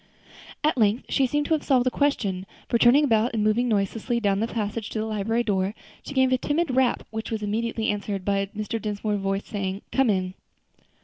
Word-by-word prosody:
At 300 -3 +2
length 215 +2 +2
she 270 - +2
seemed 295 +3 0
to 320 - +1
have 310 - +1
solved 255 -3 +2
the 255 - +2
question; 200 -11 0 0.2
for 235 - +1
turning 250 +6 +6
about 230 -3 +2
and 215 - +1
moving 220 +4 +2
noiselessly 220 +3 0
down 200 -3 +1
the 225 - 0
passage 220 -1 -3
to - - -5
the 215 - -1
library 220 +2 0
door, 195 -1 0 0.3
she 280 - -8
gave 260 -1 +4
a 255 - +2
timid 320 +4 0
little 255 - -1
rap, 260 -2 +2
which 220 0 -4
was 220 -2 -3
immediately 225 +1 -1
answered 200 -2 -4
by 200 -1 +1
Mr. 215 +1 -3
Dinsmore's 210 0 -2
voice 195 +1 -1
saying, 195 -1 -4
"Come 270 -3 +3
in." 185 -2 0
220 Hz, 210 wpm, -25 LUFS, 205-245 Hz, 0.3 s, turning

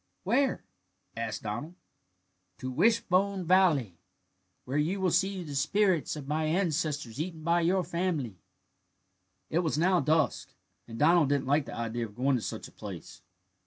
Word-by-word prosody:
"Where?" 255 +8 +1 0.5
asked 115 -1 -4
Donald. 140 +11 -5 0.8
"To 130 - -5
Wishbone 195 - +2
Valley, 160 - +3 0.7
where 135 +3 -1
you 175 +7 0
will 185 -2 +1
see 195 0 +1
the 150 -3 -7
spirits 185 +4 +1
of 145 -3 -8
my 155 +2 0
ancestors 155 - -1
eaten 165 -2 -5
by 170 +1 +2
your 180 +2 +2
family." 165 - -2 1.1
It 165 - +2
was 160 -4 0
now 180 +3 +3
dusk, 155 0 0 0.3
and 115 -1 -8
Donald 160 0 +4
didn't 140 -2 +1
like 140 +2 +2
the - - -7
idea 115 0 -3
of 105 - -18
going 130 +3 +2
to 120 - -1
such - - -5
a - - -17
place. - - -9
155 Hz, 155 wpm, -29 LUFS, 135-185 Hz, 1.1 s, Donald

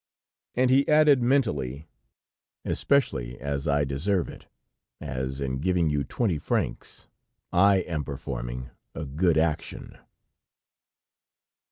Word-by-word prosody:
And 125 +1 +3
he 135 +2 +4
added, 150 -3 +5
mentally: 80 - 0 0.8
"Especially 65 - 0
as 70 +1 -3
I 70 0 +2
deserve 85 +8 -1
it, - - -12 0.5
as 65 -2 -4
in 65 -1 -2
giving 85 -1 +1
you 70 -1 0
twenty 90 - -1
francs - - -3 0.5
I 95 +1 +5
am 80 -4 -3
performing 65 -3 -5 0.2
a 80 - -4
good 80 +4 +1
action." 80 -1 -2
75 Hz, 110 wpm, -26 LUFS, 65-100 Hz, 0.8 s, added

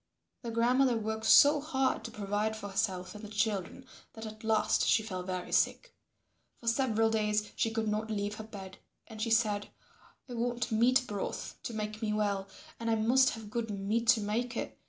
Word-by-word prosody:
Their 235 - -5
grandmother 245 +2 +3
worked 220 0 -3
so 290 +5 +7
hard 270 -3 0
to - - -4
provide 210 0 -2
for 205 -2 -7
herself 185 -2 -2
and 210 0 -10
the - - -6
children 210 +3 -2 0.3
that 220 0 -8
at 215 +1 -9
last 220 -1 +2
she 220 - +4
fell 185 -4 -4
very 180 0 -5
sick. - - +1 0.7
For - - -15
several 225 -2 +2
days 210 -1 0
she 225 - +1
could 225 0 -2
not 215 +1 -1
leave 205 0 -2
her 220 - -6
bed. 195 -3 -10 0.3
And 220 -2 -9
she 230 - 0
said, 215 -2 +2 0.6
"I 250 - -8
want 240 +1 -2
meat 250 +4 +4
broth 205 -4 -4
to 230 - -6
make 215 0 -4
me 215 -1 0
well 200 -2 0 0.3
and 230 0 -2
I 225 - +3
must 245 +4 +4
have 220 -2 -10
good 230 -1 -2
meat 210 +3 -1
to 230 -1 +5
make 230 +4 -2
it. - - -4
220 Hz, 195 wpm, -31 LUFS, 210-235 Hz, 0.7 s, so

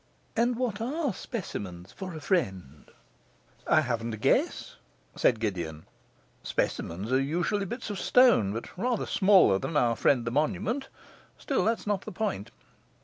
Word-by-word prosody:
And 240 +1 +2
what 230 -4 -2
are 280 +1 -1
specimens 95 - -6
for 185 -3 -7
a - - -6
friend?' 95 - -2 0.8
'I 155 - +5
haven't 115 -4 -2
a - - -11
guess,' 105 - 0 0.4
said 115 - +2
Gideon. 85 -8 -3 0.6
'Specimens 95 +8 -2
are 130 +1 +3
usually 175 +8 -1
bits 235 +1 -5
of 200 - -4
stone, 240 - +5
but 115 +3 -6
rather 235 +3 -1
smaller 190 - +5
than 155 - -2
our 120 -4 +3
friend 125 -1 +2
the 115 - -2
monument. 210 - -1 0.5
Still, - - 0
that 225 +1 +1
is - - -14
not 205 -2 0
the - - -8
point. 185 - -3
155 Hz, 150 wpm, -28 LUFS, -, 0.8 s, I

